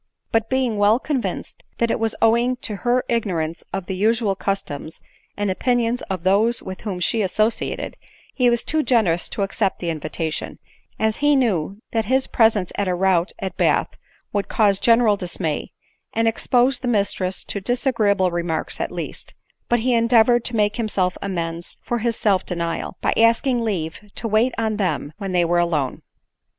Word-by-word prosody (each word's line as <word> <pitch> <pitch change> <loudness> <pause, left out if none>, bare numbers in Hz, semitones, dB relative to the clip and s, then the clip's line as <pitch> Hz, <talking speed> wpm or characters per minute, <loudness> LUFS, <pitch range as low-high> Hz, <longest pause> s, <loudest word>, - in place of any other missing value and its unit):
But, 225 0 +1
being 260 -4 0
well 205 +2 +5
convinced 265 -1 -3 0.2
that 235 -1 +1
it - - 0
was 225 0 0
owing 235 +3 +3
to 210 - -3
her 245 +3 +1
ignorance 170 -9 -1
of 195 -2 -4
the 190 - -4
usual 215 +1 +1
customs 165 -6 -4 0.4
and 205 -1 0
opinions 245 +3 0
of 185 -3 -3
those 210 +5 +2
with 185 0 -7
whom 195 -4 -4
she 220 +5 +1
associated, 215 +4 -1 0.4
he 250 -2 +3
was 235 -1 0
too 315 0 +2
generous 205 - +2
to 200 - -2
accept 195 0 0
the 170 -2 -2
invitation, 155 0 -4 0.4
as 220 0 0
he 290 0 +3
knew 200 - 0
that 225 -1 0
his 260 +1 +2
presence 220 -5 +2
at 200 - 0
a 180 - +1
rout 180 -1 +2
at 190 -2 -5
Bath - - +2 0.4
would 205 -1 -1
cause 200 -3 +2
general 230 -3 +4
dismay, 170 -5 -3 0.4
and 225 0 +1
expose 250 +3 +2
the 250 - -4
mistress 200 -4 0
to 200 - -4
disagreeable 210 -5 +1
remarks 170 -2 -2
at - - -2
least; - - -6 0.3
but 240 -1 +2
he 250 +2 +1
endeavored 230 0 +4
to 240 - -2
make 210 0 +1
himself 195 -6 0
amends 170 -3 -3
for 240 - -2
his 230 0 0
self 195 -4 +2
denial, 170 0 -3
by - - +1
asking 235 +2 +3
leave 170 -8 -2 0.2
to 230 - -2
wait 225 +4 +2
on 220 -2 -1
them 160 -6 -1
when 195 -2 -4
they 175 -1 +2
were 175 +1 +2
alone. 155 -6 0
210 Hz, 175 wpm, -22 LUFS, 185-235 Hz, 0.4 s, well